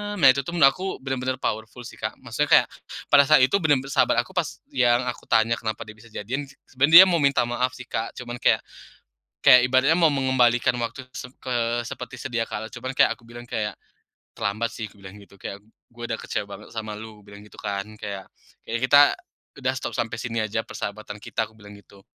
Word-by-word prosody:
nah 160 -9 +5
itu 135 - -1
aku 170 +3 +2
bener-bener 130 -1 -2
powerful 110 +3 -4
sih 115 - -11
Kak, - - -4
maksudnya - - -2
kayak - - -9 0.4
pada 140 - +7
saat 150 -2 +6
itu 130 - +3
bener-bener 145 -6 +1
sahabat - - +3
aku - - -17
pas - - -2
yang 120 -1 +3
aku - - -14
tanya 115 0 +3
kenapa 110 0 -4
dia 110 -1 -12
bisa 115 +2 -16
jadian, 130 +7 -4 0.3
sebenarnya 150 +7 +9
dia - - +4
mau 175 - +2
minta 140 -1 +3
maaf 125 +2 -1
sih 125 - -9
Kak, 115 +1 -3
cuman 120 -1 -7
kayak, - - +3 0.8
kayak 125 - +8
ibaratnya 130 +4 +4
mau 165 -2 +5
mengembalikan 130 -4 +2
waktu 120 +3 -4
se - - -7
ke 120 -1 -1
seperti 125 +1 -7
sedia 120 -3 -3
kala 110 - -5
cuman 130 +2 -6
kayak - - +5
aku - - -27
bilang 120 +1 -10
kayak 105 -3 -3 0.6
"Terlambat 110 +3 -1
sih," 110 -2 -6
aku - - -21
bilang 95 +1 -11
gitu, 100 -1 -17
kayak, 100 - -6 0.3
"gue 120 0 -12
udah - - -2
kecewa - - -3
banget - - -11
sama 110 -1 -4
lu," 110 -1 -11
bilang 100 0 -13
gitu 105 - -16
kan 100 0 -4
kayak, 100 -2 -6 0.4
"kayaknya 120 +1 -3
kita 145 +2 +7 0.7
udah 130 - +2
stop 130 -2 -4
sampai 115 -1 -2
sini 115 -2 -4
aja 110 +1 -2
persahabatan 105 -1 -7
kita," 110 +1 -3
aku 110 - -23
bilang 105 -1 -13
gitu, 100 -1 -19
120 Hz, 205 wpm, -24 LUFS, 110-130 Hz, 0.8 s, sebenarnya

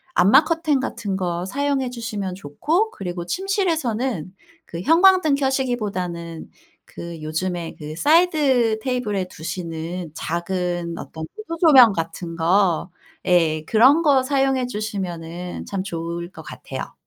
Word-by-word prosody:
암막 205 - +6
커튼 325 -4 +1
같은 225 -7 -3
거 175 -1 -2
사용해 275 +4 -1
주시면 210 -6 -4
좋고 310 - -1
그리고 175 -2 -5
침실에서는 265 - -1 0.3
그 170 +1 -7
형광등 340 - +5
켜시기보다는 205 - -2 0.4
그 170 -1 -8
요즘에 170 +2 -3
그 150 0 -7
사이드 290 - +3
테이블에 225 -7 -1
두시는 165 0 -5
작은 175 0 -2
어떤 160 0 -7
무드 335 -6 -6
조명 265 -9 +8
같은 165 0 -4
거. 175 +1 +2 0.3
예. 165 -3 +2
그런 260 - +5
거 280 -4 +5
사용해 270 -1 +1
주시면은 180 -6 -5
참 195 -2 -3
좋을 170 -2 -5
것 - - -11
같아요. - - -7
195 Hz, 270 characters per minute, -22 LUFS, 170-270 Hz, 0.4 s, 조명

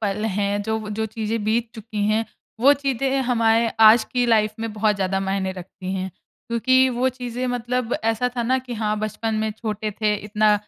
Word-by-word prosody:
पल 210 0 -1
हैं, 205 -1 0
जो 220 +1 -1
वो 215 -1 -7
जो 220 - 0
चीज़ें 220 0 -3
बीत 225 +2 0
चुकी 215 -2 -5
हैं 220 +1 +2 0.4
वो 275 +4 +7
चीज़ें 270 -1 0
हमारे 230 -2 +2
आज 220 +1 +8
की 245 -1 0
लाइफ 215 -2 +3
में 225 -1 -3
बहुत 210 0 +1
ज़्यादा 195 0 0
मायने 190 -1 -1
रखती 185 0 -7
हैं। 190 0 -3 0.4
क्योंकि 260 +3 +3
वो 255 +1 +1
चीज़ें 250 0 -4
मतलब 245 0 -1
ऐसा 225 +2 +1
था 240 - 0
ना 255 +3 +2
कि 250 -1 -7
हाँ, 215 -1 -1
बचपन 215 +1 -2
में 215 0 0
छोटे 215 -1 -4
थे, 210 -1 +2
इतना 210 +1 +2
220 Hz, 195 wpm, -22 LUFS, 210-240 Hz, 0.4 s, आज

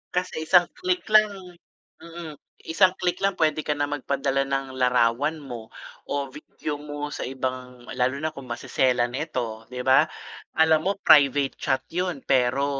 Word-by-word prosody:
Kasi 180 -3 -2
isang 175 -1 +6
click 365 0 0
lang 215 0 +6 0.7
mm, 165 -1 -9 0.3
isang 185 +3 +4
click 180 0 -1
lang, 195 0 +1
pwede 155 -1 +2
ka 150 -1 -2
nang 145 0 -1
magpadala 135 -1 -1
ng 135 -1 -2
larawan 125 +5 +2
mo 120 -6 -9 0.4
o 140 0 -1
video 150 0 -6
mo 145 0 -6
sa - - -5
ibang 130 -1 -5
lalo 125 +1 +1
na 155 +1 -3
kung 135 -2 -10
maseselan 120 0 0
ito, 120 -6 -4
di 125 0 -5
ba? 130 0 +5 0.5
Alam 160 0 +5
mo, - - +3
private 140 -4 +5
chat 130 0 0
’yon. 180 -5 -2
Pero 130 +1 +2
140 Hz, 155 wpm, -25 LUFS, 130-160 Hz, 0.7 s, isang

